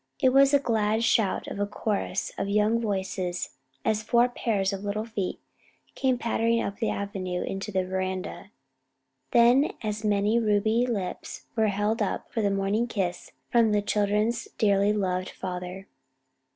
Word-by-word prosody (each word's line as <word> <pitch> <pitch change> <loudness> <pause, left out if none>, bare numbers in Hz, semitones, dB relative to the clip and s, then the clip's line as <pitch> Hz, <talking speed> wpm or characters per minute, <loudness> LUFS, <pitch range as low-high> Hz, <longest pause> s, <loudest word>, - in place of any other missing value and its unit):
It 255 - +4
was 275 0 +6
a 285 - +6
glad 220 -4 +1
shout 220 -4 +2
of - - -6
a 205 - 0
chorus 205 -2 -2
of 200 - -3
young 210 +3 +3
voices 190 - -2 0.3
as 215 -1 +1
four 235 +2 +3
pairs 205 -5 0
of 195 0 -5
little 210 +2 -2
feet 210 -5 -3 0.5
came 260 -2 +1
pattering 230 -1 +1
up 200 -3 -3
the 225 - 0
avenue 185 -3 -3
and - - -4
into 195 +2 -4
the 190 -1 0
veranda; 185 +1 -4 0.8
then 240 - +5
as 215 0 -3
many 210 +2 +2
ruby 220 +2 +2
lips 200 -7 -4
were 220 -1 +3
held 210 +3 0
up - - -2
for 225 - -1
the 205 - +2
morning 195 +4 0
kiss 185 -6 -3 0.2
from 230 -3 +4
the 205 - +3
children's 210 +3 +1
dearly 200 -1 +3
loved 185 -3 -1
father. 180 +1 -6
210 Hz, 160 wpm, -27 LUFS, 195-230 Hz, 0.8 s, was